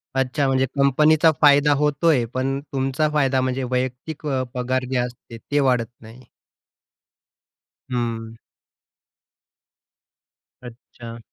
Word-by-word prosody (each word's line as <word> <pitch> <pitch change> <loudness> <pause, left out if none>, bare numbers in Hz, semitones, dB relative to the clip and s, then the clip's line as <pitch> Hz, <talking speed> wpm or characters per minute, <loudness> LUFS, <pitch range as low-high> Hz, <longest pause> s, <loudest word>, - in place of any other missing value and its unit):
अच्छा 135 +2 0
म्हणजे 130 0 +2
कंपनीचा 150 +4 +4
फायदा 145 0 +5
होतोय, 150 -3 +2
पण 135 +1 -1
तुमचा 135 +3 0
फायदा 135 -3 +2
म्हणजे 130 0 -2
वैयक्तिक 130 +5 -4
अ, 130 -2 -1
पगार 125 +1 -2
जे 130 - 0
असते 120 -1 -5
ते 145 - +2
वाढत 125 -4 +2 0.2
नाही. 115 +3 -14 1.7
हं. 115 -2 -3 2.3
अच्छा. 115 -1 -11
130 Hz, 100 wpm, -22 LUFS, 125-145 Hz, 2.3 s, फायदा